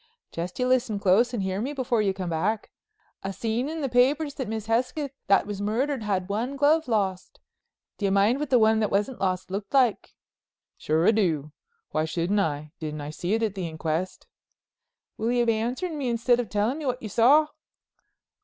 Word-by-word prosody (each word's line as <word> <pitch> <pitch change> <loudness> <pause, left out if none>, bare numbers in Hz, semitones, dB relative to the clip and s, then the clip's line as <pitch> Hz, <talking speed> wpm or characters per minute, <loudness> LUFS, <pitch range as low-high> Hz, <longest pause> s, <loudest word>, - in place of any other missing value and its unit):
"Jest 175 +2 -5
you 250 - 0
listen 255 -4 +1
close 200 +6 +3
and 230 -6 -2
hear 190 +1 -2
me 270 +5 -3
before 250 -5 0
you 200 -2 +2
come 185 -2 -4
back. 200 +7 -1 0.5
I 195 - -4
seen 230 +6 -2
in 320 0 -4
the 275 - 0
papers 275 +4 +2
that 260 -4 -4
Miss 220 0 -4
Hesketh 255 +5 -1 0.2
that 195 - +4
was 205 -1 -5
murdered 245 +6 -1
had 195 -4 -1
one 230 +7 -2
glove 300 +3 +3
lost. 195 -5 -1 0.6
Do 205 - -1
you 195 - +2
mind 205 +7 +3
what 300 -2 -3
the 255 - +5
one 220 -1 +4
that 215 - +1
wasn't 210 +6 -1
lost 185 -1 -1
looked 200 +4 -4
like?" 250 -6 +2 0.6
"Sure 160 +3 +1
I - - +7
do—why 175 - -2
shouldn't 175 +5 0
I? 150 -4 -2
Didn't 155 -2 -5
I 145 +1 -5
see 180 +6 -1
it 225 - -1
at 215 -3 0
the 185 -3 -4
inquest?" 160 +3 -3 0.9
"Will 225 +2 0
you 240 -1 +2
be 230 - +3
answering 260 +9 -3
me 260 -3 -1
instead 235 +1 +2
of 235 -5 -3
tellin' 215 +8 0
me 300 - -4
what 250 0 -2
you 215 - -4
saw?" 285 +9 +5
220 Hz, 200 wpm, -26 LUFS, 190-255 Hz, 0.9 s, I